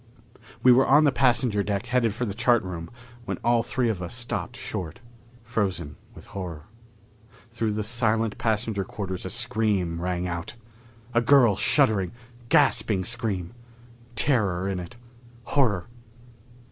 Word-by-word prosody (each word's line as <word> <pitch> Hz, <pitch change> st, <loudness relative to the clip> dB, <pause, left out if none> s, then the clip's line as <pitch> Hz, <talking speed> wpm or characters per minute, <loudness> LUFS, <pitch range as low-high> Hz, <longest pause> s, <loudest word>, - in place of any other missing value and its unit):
We 125 Hz, -, +8 dB
were 130 Hz, +2 st, +5 dB
on 145 Hz, +3 st, +6 dB
the 145 Hz, -, +4 dB
passenger 125 Hz, -5 st, +2 dB
deck 100 Hz, +2 st, -2 dB
headed 120 Hz, -2 st, +1 dB
for 125 Hz, -, -2 dB
the 100 Hz, -, -3 dB
chart 120 Hz, +1 st, +2 dB
room 85 Hz, -3 st, -6 dB, 0.4 s
when -, -, -3 dB
all 120 Hz, 0 st, +3 dB
three 125 Hz, +1 st, -1 dB
of 105 Hz, -5 st, -2 dB
us 90 Hz, +6 st, -6 dB
stopped 120 Hz, 0 st, -3 dB
short, 105 Hz, -9 st, -5 dB, 0.4 s
frozen 95 Hz, -, -2 dB, 0.2 s
with -, -, -13 dB
horror. 90 Hz, -6 st, -6 dB, 0.9 s
Through 115 Hz, -2 st, -1 dB
the 105 Hz, 0 st, -2 dB
silent 115 Hz, -1 st, 0 dB
passenger 110 Hz, -2 st, 0 dB
quarters 95 Hz, -1 st, -5 dB
a -, -, -3 dB
scream 105 Hz, -8 st, 0 dB
rang 90 Hz, 0 st, -2 dB
out! 85 Hz, +5 st, -5 dB, 0.6 s
A 120 Hz, -, +3 dB
girl's 120 Hz, -5 st, +5 dB
shuddering, 110 Hz, -10 st, +3 dB, 0.4 s
gasping 110 Hz, -4 st, +3 dB
scream. 110 Hz, -6 st, -2 dB, 0.6 s
Terror 100 Hz, -8 st, +1 dB
in 95 Hz, -2 st, -2 dB
it. 90 Hz, +6 st, -9 dB, 0.5 s
Horror. 115 Hz, -10 st, +1 dB
110 Hz, 140 wpm, -25 LUFS, 95-120 Hz, 0.9 s, We